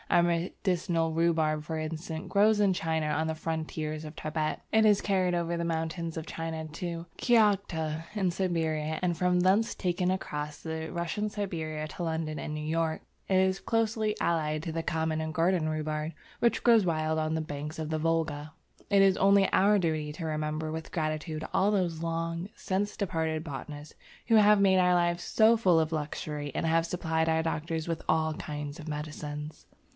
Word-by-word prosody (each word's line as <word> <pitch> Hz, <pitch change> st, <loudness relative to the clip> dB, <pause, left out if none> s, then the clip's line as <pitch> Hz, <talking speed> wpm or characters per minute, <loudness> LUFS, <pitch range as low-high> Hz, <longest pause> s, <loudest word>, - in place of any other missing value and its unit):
Our 175 Hz, -, +5 dB
medicinal 170 Hz, -1 st, 0 dB
rhubarb 160 Hz, -2 st, +1 dB
for 160 Hz, +1 st, -4 dB
instance, 160 Hz, +1 st, -4 dB
grows 210 Hz, +1 st, +4 dB
in 200 Hz, -2 st, +4 dB
China 160 Hz, -3 st, -1 dB
on 150 Hz, +1 st, 0 dB
the 160 Hz, -, -2 dB
frontiers 155 Hz, -1 st, -3 dB
of 155 Hz, 0 st, -8 dB
Tibet; 155 Hz, 0 st, -2 dB
it 220 Hz, 0 st, +5 dB
is 210 Hz, -2 st, +5 dB
carried 185 Hz, -3 st, +1 dB
over 170 Hz, 0 st, -1 dB
the 170 Hz, -, -2 dB
mountains 165 Hz, 0 st, -2 dB
of 160 Hz, -, -4 dB
China 160 Hz, -1 st, -4 dB
to 170 Hz, +2 st, -5 dB
Kiaghta 190 Hz, -9 st, +2 dB
in 195 Hz, -4 st, +1 dB
Siberia, 160 Hz, -4 st, -1 dB
and 175 Hz, -2 st, +1 dB
from 180 Hz, +1 st, +2 dB
thence 195 Hz, +5 st, +3 dB
taken 180 Hz, -1 st, 0 dB
right 185 Hz, -, +3 dB
across 150 Hz, -4 st, -6 dB
Russian 170 Hz, +6 st, -3 dB
Siberia 160 Hz, -7 st, -3 dB
to 175 Hz, -, -6 dB
London 160 Hz, -2 st, -2 dB
and 150 Hz, -, -4 dB
New 150 Hz, -, -4 dB
York. 160 Hz, 0 st, 0 dB, 0.3 s
It 190 Hz, -, +4 dB
is 190 Hz, 0 st, +2 dB
closely 220 Hz, -1 st, 0 dB
allied 155 Hz, -2 st, 0 dB
to 165 Hz, -, -3 dB
the 165 Hz, 0 st, -2 dB
common 160 Hz, -1 st, -1 dB
or 160 Hz, 0 st, -3 dB
garden 165 Hz, 0 st, +1 dB
rhubarb, 155 Hz, 0 st, -2 dB, 0.3 s
which 235 Hz, -, +2 dB
grows 230 Hz, -3 st, +6 dB
wild 160 Hz, -2 st, 0 dB
on 155 Hz, 0 st, 0 dB
the -, -, 0 dB
banks 150 Hz, 0 st, -5 dB
of 155 Hz, -1 st, -3 dB
the 155 Hz, 0 st, -1 dB
Volga. 155 Hz, -2 st, -1 dB, 0.4 s
It 200 Hz, -1 st, +5 dB
is 195 Hz, -1 st, +5 dB
only 195 Hz, 0 st, +5 dB
our 205 Hz, +2 st, +5 dB
duty 155 Hz, -4 st, -1 dB
to 165 Hz, +2 st, -6 dB
remember 155 Hz, 0 st, -2 dB
with 160 Hz, 0 st, -6 dB
gratitude 155 Hz, -1 st, -2 dB
all 200 Hz, -, +3 dB
those 175 Hz, -5 st, 0 dB
long 165 Hz, +2 st, -2 dB
since 200 Hz, 0 st, -2 dB
departed 160 Hz, -5 st, -1 dB
botanists 145 Hz, +1 st, -7 dB, 0.3 s
who 230 Hz, -, +4 dB
have 210 Hz, -1 st, +6 dB
made 190 Hz, -1 st, +5 dB
our 180 Hz, 0 st, +4 dB
life 175 Hz, 0 st, +1 dB
so 220 Hz, +5 st, +4 dB
full 185 Hz, -7 st, +4 dB
of 160 Hz, 0 st, 0 dB
luxury 150 Hz, -1 st, -3 dB
and -, -, -1 dB
have 165 Hz, +1 st, +3 dB
supplied 160 Hz, -2 st, 0 dB
our 160 Hz, 0 st, +2 dB
doctors 160 Hz, 0 st, -2 dB
with 165 Hz, -1 st, -2 dB
all 160 Hz, 0 st, +2 dB
kinds 150 Hz, -1 st, -6 dB
of 160 Hz, 0 st, -7 dB
medicines. 150 Hz, 0 st, -6 dB
165 Hz, 180 wpm, -29 LUFS, 155-180 Hz, 0.4 s, grows